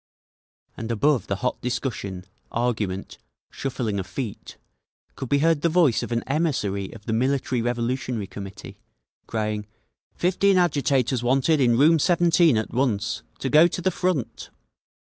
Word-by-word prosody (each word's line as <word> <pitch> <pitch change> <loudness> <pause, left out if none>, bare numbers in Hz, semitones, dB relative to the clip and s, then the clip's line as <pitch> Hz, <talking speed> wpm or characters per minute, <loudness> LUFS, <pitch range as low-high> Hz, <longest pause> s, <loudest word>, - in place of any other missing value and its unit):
And 115 +1 -5
above 125 0 +1
the 100 - -1
hot 125 +6 -2
discussion, 105 -7 -3 0.3
argument, 110 -5 -2 0.3
shuffling 115 -6 -3
of 95 - -5
feet 120 -7 -6 0.6
could 135 -3 -6
be 140 - +3
heard 165 -3 +3
the 170 - +2
voice 160 -8 +3
of - - -6
an 115 -1 0
emissary 130 - -1
of 105 -2 -13
the 110 - -2
Military 130 +1 0
Revolutionary 120 -1 -2
Committee, 100 0 -9 0.5
crying, 105 -2 -2 0.5
"Fifteen 190 +2 +2
agitators 140 -7 +1
wanted 135 +5 +2
in 120 -2 +4
room 160 +4 +5
17 170 - +4
at 110 - -2
once! 115 -5 0 0.2
To 135 - -1
go 155 +4 +7
to 175 - -4
the 185 +2 +1
Front!" 180 -8 -2
125 Hz, 145 wpm, -24 LUFS, 110-150 Hz, 0.6 s, go